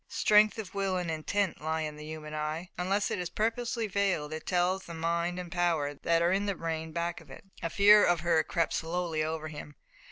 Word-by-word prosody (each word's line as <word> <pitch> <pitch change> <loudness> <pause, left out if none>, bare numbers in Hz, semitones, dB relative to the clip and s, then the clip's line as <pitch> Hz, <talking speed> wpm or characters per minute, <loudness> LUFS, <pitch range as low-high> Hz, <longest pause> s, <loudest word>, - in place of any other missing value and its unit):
Strength 210 +1 +4
of 205 -5 -6
will 195 -2 0
and 175 -2 -2
intent 180 +4 -1
lie 160 +1 -1
in 155 -1 -4
the 150 - -10
human 155 -1 -7
eye. 155 +3 -3
Unless 195 +3 0
it - - -1
is 180 -1 -3
purposely 230 +1 -1
veiled 190 -7 0
it 155 - -7
tells 185 +1 +1
the 170 - -8
mind 170 +2 -1
and 180 -1 -6
power 170 -5 +1
that 165 +3 +1
are 170 - +3
in 200 +2 +1
the 200 - 0
brain 160 -1 -4
back 170 +1 -3
of 155 - -18
it. 135 - -11 0.2
A 165 - -2
fear 205 +3 +7
of 175 -2 +3
her 170 -1 +3
crept 170 -2 -1
slowly 165 -1 -1
over 155 0 -3
him. 150 -1 -9
170 Hz, 220 wpm, -30 LUFS, 160-190 Hz, 0.2 s, fear